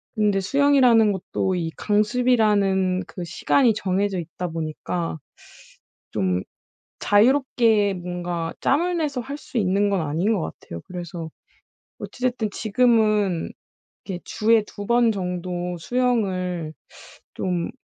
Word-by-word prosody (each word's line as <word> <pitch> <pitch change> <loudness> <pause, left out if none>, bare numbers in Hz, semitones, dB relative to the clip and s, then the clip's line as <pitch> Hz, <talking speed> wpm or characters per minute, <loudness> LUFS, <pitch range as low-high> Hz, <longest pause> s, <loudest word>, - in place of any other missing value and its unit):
근데 210 -3 +2
수영이라는 255 -2 +4
것도 190 0 -2
이 165 -2 -2
강습이라는 210 -4 +2
그 180 - -7
시간이 235 +7 +2
정해져 195 -1 -1
있다 170 +2 -5
보니까 165 +1 -4 0.9
좀 90 -1 0 0.6
자유롭게 225 -2 +3
뭔가 175 -2 -4
짬을 345 +5 +1
내서 290 -6 -1
할 280 +4 -6
수 260 - -7
있는 200 0 +2
건 195 -3 +1
아닌 165 +8 0
것 190 - -1
같아요. 85 - -7
그래서 175 -2 -6 0.7
어찌 250 - -8
됐든 245 -4 0
지금은 215 -5 +2 0.5
이렇게 180 -3 -5
주에 225 0 +2
2 205 - -8
번 235 -1 +4
정도 180 -2 -3
수영을 185 -8 -1 0.6
좀 180 -2 -2
200 Hz, 240 characters per minute, -23 LUFS, 180-230 Hz, 0.9 s, 수영이라는